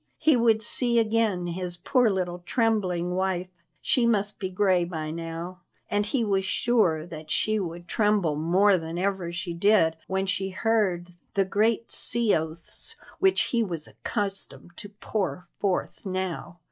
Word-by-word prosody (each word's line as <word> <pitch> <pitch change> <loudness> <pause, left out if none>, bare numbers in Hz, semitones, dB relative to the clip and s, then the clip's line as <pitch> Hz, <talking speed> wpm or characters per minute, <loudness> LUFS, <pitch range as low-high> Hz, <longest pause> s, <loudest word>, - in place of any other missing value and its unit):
He 310 -3 +3
would 225 -2 +3
see 235 +1 +2
again 220 -5 +1
his 175 0 -4
poor 250 +3 +2
little 180 -3 -2
trembling 185 -6 0
wife 185 -1 -1 0.3
she 240 -2 +2
must 210 -2 0
be 190 - -3
gray 185 -1 +2
by 160 -3 -4
now 165 +2 -6 0.3
and 205 0 0
he 240 +2 0
was 195 -2 +1
sure 190 -8 +1
that 155 -2 -10
she 215 +6 +1
would 175 -2 -6
tremble 205 -8 +1
more 185 +5 +3
than 165 +1 -6
ever 190 -2 -1
she 175 0 -4
did 170 -2 +3
when 190 0 -1
she 195 0 -1
heard 190 -3 0 0.3
the 195 -1 +2
great 220 +4 0
sea 235 -2 +6
oaths 160 +1 -5 0.2
which 385 -1 +3
he 235 - +3
was 170 -7 -1
accustomed 195 - -5
to 205 - -8
pour 200 -3 -4
forth 195 -3 -2
now. 185 -3 -4
190 Hz, 155 wpm, -26 LUFS, 175-215 Hz, 0.3 s, sea